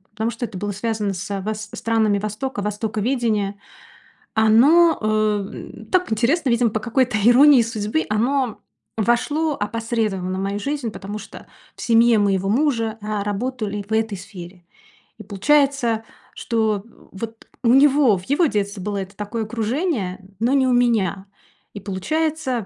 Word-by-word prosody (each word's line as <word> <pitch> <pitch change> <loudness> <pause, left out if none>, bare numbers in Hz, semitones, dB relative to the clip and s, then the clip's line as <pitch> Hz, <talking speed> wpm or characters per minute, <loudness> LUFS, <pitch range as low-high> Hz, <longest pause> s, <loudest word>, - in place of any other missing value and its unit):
потому 220 +2 -1
что 240 +2 -4
это 200 - -8
было 205 +2 -3
связано 210 0 -2
с 200 +1 -4
вос 215 +2 -5
странами 220 -3 +1
востока, 215 +3 -4
востоковедения. 210 0 -1 0.7
Оно, 275 +10 +5
эм, 215 -2 -2
так 365 -9 +1
интересно, 255 +7 +1
видимо 235 0 +3
по 215 - -2
какой-то 245 0 0
иронии 255 +3 +7
судьбы, 215 -8 -2
оно 245 +2 0 0.4
вошло 290 +8 +1
опосредованно 215 -6 -2
в - - -3
мою 200 +1 -2
жизнь, 275 0 -3
потому 205 +1 -7
что 215 - -12 0.3
в - - -11
семье 230 -1 +4
моего 195 -1 +1
мужа, 230 -3 +1
а, 210 -1 -3
работали 210 0 -3
в - - -17
этой 220 -2 0
сфере. 180 -2 -11 0.5
И - - -8
получается, 255 0 +1 0.3
что, 220 -4 -1 0.3
вот, 225 +3 -8 0.2
у 230 - +3
него, 270 -3 +5
в 180 - -11
его 295 - +3
детстве 205 -5 -2
было 205 +1 -3
это 195 0 -7
такое 215 +2 -4
окружение, 220 - -2 0.2
но 235 +3 +2
не 270 -2 +3
у 255 - +2
меня. 220 -6 +1 0.5
И 205 - -6
получается, 310 - -2
220 Hz, 145 wpm, -21 LUFS, 205-250 Hz, 0.7 s, иронии